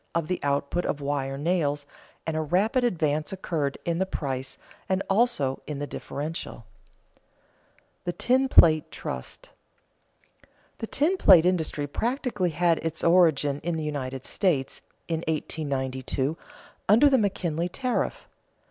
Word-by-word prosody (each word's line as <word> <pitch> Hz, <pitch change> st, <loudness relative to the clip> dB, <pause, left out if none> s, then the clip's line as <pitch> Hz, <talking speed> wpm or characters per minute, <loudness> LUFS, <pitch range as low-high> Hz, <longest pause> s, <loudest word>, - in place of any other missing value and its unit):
of 165 Hz, -2 st, 0 dB
the 180 Hz, -, -1 dB
output 140 Hz, +4 st, 0 dB
of 145 Hz, -, -2 dB
wire 140 Hz, -1 st, -2 dB
nails, 145 Hz, -2 st, 0 dB, 0.4 s
and 160 Hz, -, -2 dB
a 160 Hz, -, 0 dB
rapid 200 Hz, -, +1 dB
advance 155 Hz, -9 st, 0 dB
occurred 160 Hz, -7 st, -2 dB
in 170 Hz, 0 st, 0 dB
the 190 Hz, -, +2 dB
price 135 Hz, -7 st, -4 dB, 0.3 s
and 190 Hz, +1 st, +1 dB
also 195 Hz, -, +1 dB
in 150 Hz, -, -4 dB
the 145 Hz, -, -3 dB
differential. 145 Hz, -4 st, -6 dB, 0.4 s
[Sidenote: -, -, -38 dB
The 175 Hz, -, 0 dB
tin 260 Hz, +6 st, +2 dB
plate 155 Hz, -8 st, +6 dB
trust] 65 Hz, -, -7 dB, 1.3 s
The 225 Hz, -, -4 dB
tin 325 Hz, -, +1 dB
plate 180 Hz, -, +7 dB
industry 160 Hz, -5 st, 0 dB
practically 225 Hz, -, -1 dB
had 170 Hz, 0 st, +2 dB
its 165 Hz, 0 st, -3 dB
origin 155 Hz, -5 st, +4 dB
in 170 Hz, +2 st, -2 dB
the 160 Hz, -, -3 dB
United 135 Hz, -3 st, -4 dB
States, 155 Hz, -9 st, 0 dB, 0.3 s
in 165 Hz, -1 st, -1 dB
1892, 135 Hz, -3 st, -2 dB, 0.5 s
under 230 Hz, +8 st, +7 dB
the 270 Hz, -2 st, +4 dB
McKinley 175 Hz, -5 st, -1 dB
tariff. 255 Hz, +6 st, -2 dB
160 Hz, 135 wpm, -26 LUFS, 145-185 Hz, 1.3 s, plate